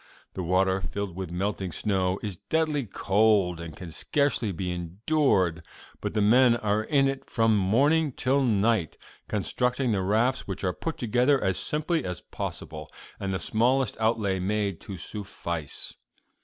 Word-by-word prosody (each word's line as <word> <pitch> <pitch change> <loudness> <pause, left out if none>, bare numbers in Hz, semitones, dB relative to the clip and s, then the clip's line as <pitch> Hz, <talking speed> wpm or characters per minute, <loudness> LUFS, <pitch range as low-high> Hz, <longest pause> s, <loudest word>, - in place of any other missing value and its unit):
The 95 - -4
water, 95 +2 +2
filled 95 0 -4
with 95 -2 -5
melting 95 +1 -2
snow, 95 -1 0
is 100 -5 -4
deadly 155 - 0
cold 100 -3 +2
and 80 -2 -8
can 90 -3 -8
scarcely 140 - 0
be 90 0 -3
endured, 90 - +1 0.4
but - - -4
the 105 - +3
men 120 +3 +6
are 110 -1 0
in 135 +1 +3
it 135 0 -4
from 115 -2 +3
morning 140 +11 +3
till 135 +2 +1
night 110 - +1 0.3
constructing 125 - 0
the 100 -3 +1
rafts, 115 +7 +1
which 95 -1 -5
are 90 -2 +1
put 165 - -4
together 125 +4 +2
as 95 -2 0
simply 155 +2 -1
as 90 -1 -4
possible, 75 -1 -6 0.3
and 95 -1 -2
the 95 - -1
smallest 120 +6 +1
outlay 110 -4 +1
made 100 -1 -1
to 95 - -7
suffice. 85 -5 -5
105 Hz, 155 wpm, -27 LUFS, 95-125 Hz, 0.4 s, men